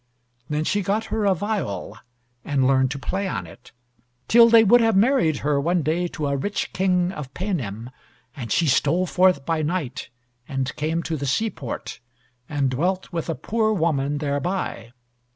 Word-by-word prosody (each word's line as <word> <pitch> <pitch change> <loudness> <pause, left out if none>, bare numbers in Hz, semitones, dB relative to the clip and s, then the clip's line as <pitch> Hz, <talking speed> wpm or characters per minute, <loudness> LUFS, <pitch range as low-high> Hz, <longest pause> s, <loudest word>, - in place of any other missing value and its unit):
Then 150 +1 -1
she 205 +6 0
got 205 +3 -1
her 220 -1 0
a 195 -2 +3
viol, 160 - -3 0.5
and 135 -3 +1
learned 130 0 +3
to 135 - -4
play 190 +8 -3
on 100 - -3
it; 85 - -15 0.6
till 235 0 +7
they 230 -1 +7
would 240 +3 +6
have 225 -2 +3
married 205 - +3
her 145 -1 +2
one 170 +2 +1
day 165 +4 0
to 155 -3 -5
a 140 0 0
rich 200 +10 -3
king 180 -1 +1
of 150 -8 -7
Paynim, 125 - -4 0.4
and 120 -6 -6
she 170 - +2
stole 150 +5 +2
forth 180 -6 +2
by 165 -1 0
night, 150 -4 -3 0.4
and 135 -1 -3
came 160 +2 -1
to 165 - -2
the 140 0 -4
seaport, 140 - -3 0.5
and 140 -3 0
dwelt 180 +8 -1
with 165 0 -3
a 165 - -1
poor 220 0 0
woman 150 -6 0
thereby. 145 - -3
160 Hz, 170 wpm, -23 LUFS, 140-190 Hz, 0.6 s, till